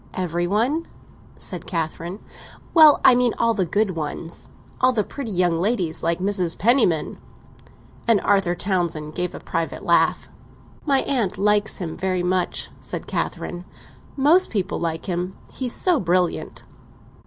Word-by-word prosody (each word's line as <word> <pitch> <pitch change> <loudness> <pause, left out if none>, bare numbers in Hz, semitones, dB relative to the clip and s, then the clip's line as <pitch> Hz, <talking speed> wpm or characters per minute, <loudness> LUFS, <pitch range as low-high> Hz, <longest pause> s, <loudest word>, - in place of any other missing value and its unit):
"Every 175 -1 -1
one?" 245 - 0 0.5
said 180 -4 -4
Catherine. 170 +3 -4 0.5
"Well, 310 -3 +8
I - - +9
mean 245 -1 +2
all 230 0 +2
the 190 -5 -1
good 205 +3 +1
ones. 165 0 -5 0.3
All 255 0 +4
the 215 -3 +1
pretty 275 0 -6
young 175 -4 +1
ladies—like 170 -5 0
Mrs. 185 -3 0
Penniman!" 220 - +2 0.9
and 230 -3 +5
Arthur 195 -3 +2
Townsend 170 -5 -2
gave 180 +1 -3
a - - -7
private 165 0 -4
laugh. - - +2 0.6
"My 275 -2 +3
aunt 230 -10 -1
likes 210 +2 +2
him 170 -5 -5
very 185 -1 -1
much," 180 0 -1
said - - -4
Catherine. 175 0 -3 0.5
"Most 315 +7 +4
people 200 -4 -2
like 165 -1 -3
him—he's 185 +7 -4
so 355 -5 +2
brilliant." 180 -2 -1
185 Hz, 135 wpm, -22 LUFS, 175-230 Hz, 0.9 s, I